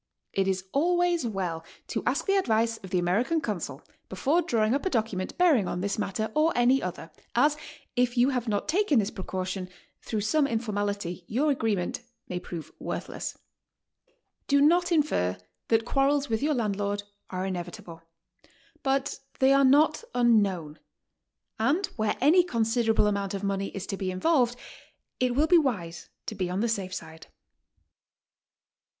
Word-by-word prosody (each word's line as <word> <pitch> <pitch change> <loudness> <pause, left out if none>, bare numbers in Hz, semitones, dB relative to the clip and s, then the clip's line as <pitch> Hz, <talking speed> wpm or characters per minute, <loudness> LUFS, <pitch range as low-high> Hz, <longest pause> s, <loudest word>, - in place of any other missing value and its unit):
It 195 -1 +1
is 190 -1 0
always 345 -1 +2
well 180 -6 -3 0.3
to - - -2
ask - - +1
the 395 - +2
advice 230 - +1
of 190 - -11
the 180 - 0
American 210 - +1
consul 170 - -4 0.3
before 280 - +1
drawing 230 -8 +1
up 280 - 0
a 380 - 0
document 215 - -2
bearing 310 - +4
on 175 - -3
this 200 +2 -2
matter 215 +2 -2
or 310 +2 +3
any 250 +2 +4
other, 170 -2 -6 0.2
as, 290 +5 +4 0.4
if 245 0 +1
you 245 +2 +5
have 250 -3 -2
not 205 -2 -1
taken 370 -4 +2
this 205 -2 +1
pre 190 - -7
caution, 185 0 -4 0.3
through 215 -2 -3
some 280 +7 +2
informality 205 -6 -2
your 285 +7 +1
agreement 220 -9 -1 0.3
may 180 - -3
prove 165 -4 -8
worthless. - - -5 1.1
D.o 280 0 +4
not 350 +5 +4
infer 285 - +1 0.3
that 225 0 +2
quarrels 275 +2 +1
with 225 +1 0
your 300 +1 +1
landlord 205 -3 -1 0.3
are 185 0 -3
inevitable; 175 -1 -6 0.8
but 270 0 0 0.2
they 265 +1 +5
are 275 0 +5
not 295 - +4
unknown, 200 -10 +2 0.8
and 290 - +2
where 220 -2 0
any 320 +7 +5
considerable 225 -6 +1
amount 200 -1 -1
of 195 - -5
money 195 0 -1
is 195 -1 -6
to 195 - -4
be 190 -1 -2
involved, 245 - +2 0.6
it 250 -1 +1
will 295 +4 +4
be 345 +1 +6
wise 185 - -3 0.2
to - - -4
be 185 -3 -2
on 185 +3 -1
the 235 - +2
safe 195 -5 -2
side. 160 -3 -8
220 Hz, 160 wpm, -27 LUFS, 190-275 Hz, 1.1 s, be